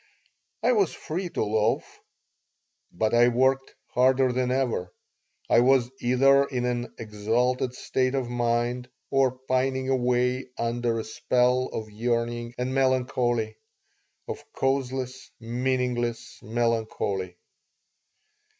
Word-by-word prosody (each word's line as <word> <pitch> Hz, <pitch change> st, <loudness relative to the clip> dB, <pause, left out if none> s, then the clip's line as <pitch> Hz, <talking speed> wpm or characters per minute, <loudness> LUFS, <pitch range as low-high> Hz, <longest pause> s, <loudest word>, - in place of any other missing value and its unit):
I 245 Hz, -, +4 dB
was 205 Hz, -7 st, +2 dB
free 175 Hz, +3 st, -4 dB
to -, -, -1 dB
loaf, 110 Hz, +4 st, 0 dB, 0.9 s
but 110 Hz, +5 st, 0 dB
I 120 Hz, +1 st, +6 dB
worked 130 Hz, +2 st, +1 dB, 0.2 s
harder 130 Hz, 0 st, +3 dB
than 125 Hz, 0 st, 0 dB
ever. 125 Hz, -9 st, -1 dB, 0.6 s
I -, -, +5 dB
was 125 Hz, 0 st, +4 dB
either 135 Hz, +3 st, +4 dB
in 125 Hz, -3 st, -2 dB
an 120 Hz, 0 st, -2 dB
exalted 115 Hz, +4 st, 0 dB
state 130 Hz, +1 st, 0 dB
of 130 Hz, -3 st, -1 dB
mind 120 Hz, +1 st, -1 dB, 0.2 s
or 135 Hz, -2 st, +2 dB
pining 130 Hz, 0 st, 0 dB
away 125 Hz, 0 st, +1 dB
under 115 Hz, 0 st, -1 dB
a -, -, -3 dB
spell 125 Hz, +3 st, +1 dB
of 110 Hz, -1 st, -5 dB
yearning 120 Hz, +1 st, -2 dB
and 125 Hz, +1 st, -2 dB
melancholy 125 Hz, -4 st, +1 dB, 0.7 s
of -, -, -6 dB
causeless, 130 Hz, -1 st, -2 dB
meaningless 120 Hz, 0 st, -2 dB
melancholy. 110 Hz, -5 st, -1 dB
125 Hz, 110 wpm, -26 LUFS, 120-130 Hz, 0.9 s, I